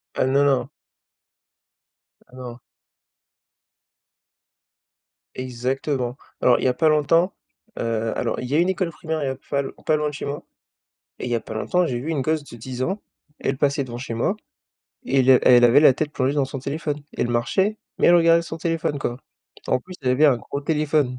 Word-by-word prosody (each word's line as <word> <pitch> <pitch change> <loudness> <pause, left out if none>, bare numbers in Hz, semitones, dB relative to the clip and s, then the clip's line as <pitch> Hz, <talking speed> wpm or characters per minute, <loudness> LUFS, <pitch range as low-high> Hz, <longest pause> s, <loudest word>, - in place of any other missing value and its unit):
Ah, - - +1
non, 140 +2 +3
non. 130 -2 +1 1.6
Ah 125 - -18
non. 125 -2 -8 2.8
Exactement. 130 0 -2 0.3
Alors, 125 - +4
il - - -2
y - - +5
a 125 - +2
pas 155 +5 +3
longtemps, 165 +5 +3 0.5
heu, 115 -1 -1
alors - - -2
il 125 - -4
y 135 - -4
a - - +4
une 175 +2 +3
école 185 -2 -1
primaire, 160 -1 -4
il - - -1
y - - 0
a 130 - -3
p 135 - -24
fa 140 - -2
l 135 - -6
pas 155 - +3
loin 150 0 0
de - - -10
chez 145 - -5
moi. 140 +1 -5 0.8
Et - - -6
il 125 - -3
y - - +1
a 115 - 0
pas 110 - -8
longtemps, 180 +11 +1
j'ai 125 -4 -2
vu 140 +7 -4
une 155 -4 -1
gosse 155 +2 0
de 120 - -11
10 125 +2 -6
ans, 190 +9 -2 0.4
elle 135 - -1
passait 140 0 +1
devant 120 -2 -7
chez 120 -2 -5
moi 155 - 0 0.7
et 135 0 +2
le 130 0 +5
et 125 - +8
elle 120 - +4
avait 120 +4 +6
la 150 - +7
tête 150 +3 -3
plongée 130 +1 0
dans 145 -2 +1
son 135 +1 -6
téléphone. 150 +2 -3 0.2
Elle - - +1
marchait, 155 - +1 0.2
mais - - +3
elle 175 - +7
regardait 165 0 +5
son 165 -1 -7
téléphone, 165 -3 -1
quoi. 120 -1 -3 0.5
Et - - -5
en - - +2
plus, 185 +6 -11
elle 125 -1 +1
avait 145 +5 +4
un 135 -5 +4
gros 140 +5 -6
téléphone. 150 -4 0
140 Hz, 215 wpm, -23 LUFS, 125-155 Hz, 2.8 s, et